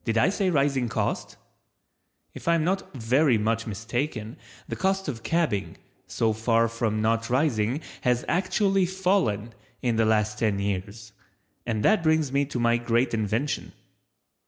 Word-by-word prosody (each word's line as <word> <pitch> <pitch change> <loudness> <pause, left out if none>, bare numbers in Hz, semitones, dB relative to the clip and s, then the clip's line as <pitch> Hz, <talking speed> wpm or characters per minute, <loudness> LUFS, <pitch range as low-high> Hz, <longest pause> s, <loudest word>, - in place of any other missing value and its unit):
Did 115 -1 -1
I 115 - +4
say 195 -1 0
rising 140 -6 +1
cost? - - -2 1.0
If - - -11
I 170 - +5
am 165 - +1
not 190 +3 -1
very 130 +2 +3
much 115 +2 -1
mistaken 115 +2 -3 0.3
the - - -4
cost 190 0 0
of 120 -6 -4
cabbing, 110 - -1 0.3
so 110 -1 0
far 115 +1 +2
from 110 -2 -1
not 115 +1 +1
rising 125 -1 +1 0.2
has 125 -1 +1
actually 190 +2 +1
fallen 180 - 0 0.3
in 120 -3 +1
the 115 - +3
last 105 -1 +1
ten 105 -3 +1
years, 100 +2 -4 0.6
and 110 -3 -1
that 215 -4 +4
brings 155 -3 +2
me 140 +1 +2
to 130 -3 -4
my 120 0 +3
great 120 +1 0
invention. 110 +6 -1
120 Hz, 155 wpm, -26 LUFS, 110-155 Hz, 1.0 s, I